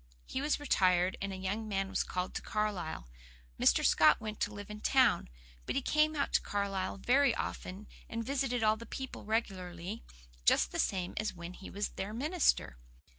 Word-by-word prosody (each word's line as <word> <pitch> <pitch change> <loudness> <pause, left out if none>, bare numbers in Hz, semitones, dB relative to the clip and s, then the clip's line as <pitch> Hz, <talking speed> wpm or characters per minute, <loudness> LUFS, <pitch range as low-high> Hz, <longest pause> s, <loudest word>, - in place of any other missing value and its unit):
He 260 - -3
was 295 +1 +1
retired, 185 -9 +3
and 195 0 -2
a - - -4
young 195 +4 -3
man 195 -2 -1
was - - 0
called 180 0 -3
to - - -3
Carlisle. 195 - -2 0.5
Mr. - - +4
Scott 155 - +6
went 215 -2 -6
to 205 - 0
live 205 0 -8
in 210 - -7
town, 255 -9 +3 0.4
but - - -1
he - - +2
came 305 +2 +3
out 280 - -1
to - - +4
Carlisle 200 -2 -2
very 250 +4 +3
often, 190 +3 -5 0.2
and 230 0 -3
visited 260 -3 0
all 215 0 +4
the 230 - -10
people 265 -5 -6
regularly, 190 -2 -3 0.4
just - - +4
the - - -3
same 185 -3 0
as 215 -2 -1
when 170 +1 -7
he 190 - -10
was 205 +1 -2
their 200 +2 -5
minister. 280 - +1
210 Hz, 185 wpm, -33 LUFS, 185-235 Hz, 0.5 s, Scott